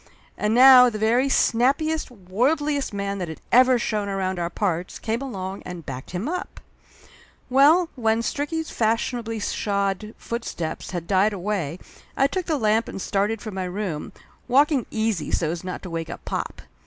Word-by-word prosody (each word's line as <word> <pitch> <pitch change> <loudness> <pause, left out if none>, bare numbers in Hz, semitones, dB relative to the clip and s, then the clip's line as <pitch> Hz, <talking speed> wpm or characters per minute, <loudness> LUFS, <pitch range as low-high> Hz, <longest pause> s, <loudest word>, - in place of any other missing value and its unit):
And 210 +1 0
now 250 0 +9
the 215 - -5
very 235 +5 +2
snappiest, 280 +7 +2
worldliest 260 - 0
man 200 -1 -3
that 180 - -3
had 160 - -8
ever 255 +1 +6
shown 210 -3 -2
around 190 -2 -2
our 170 0 -1
parts 180 -1 -2
came 230 +3 -2
along 195 -7 -5
and 175 -3 -8
backed 130 -1 -7
him 185 +7 -3
up! 360 +3 -4 0.9
Well, 300 +7 +6
when 225 -2 +1
Stricky's 310 +5 -2
fashionably 225 0 -1
shod 200 0 -2
footsteps 200 -9 -5
had 175 -3 -4
died 200 +3 +2
away 185 -5 -2 0.4
I 270 - +4
took 360 +6 -2
the 315 -3 +1
lamp 220 -1 +2
and - - -6
started 205 +3 -1
for 215 - -5
my 190 -1 -3
room, 180 -4 -4 0.4
walking 275 +1 +3
easy 220 -7 -1
so's 165 +1 -1
not 185 -1 -6
to 185 - -6
wake 165 -1 -4
up - - -8
pop. - - -4
215 Hz, 165 wpm, -24 LUFS, 185-255 Hz, 0.9 s, now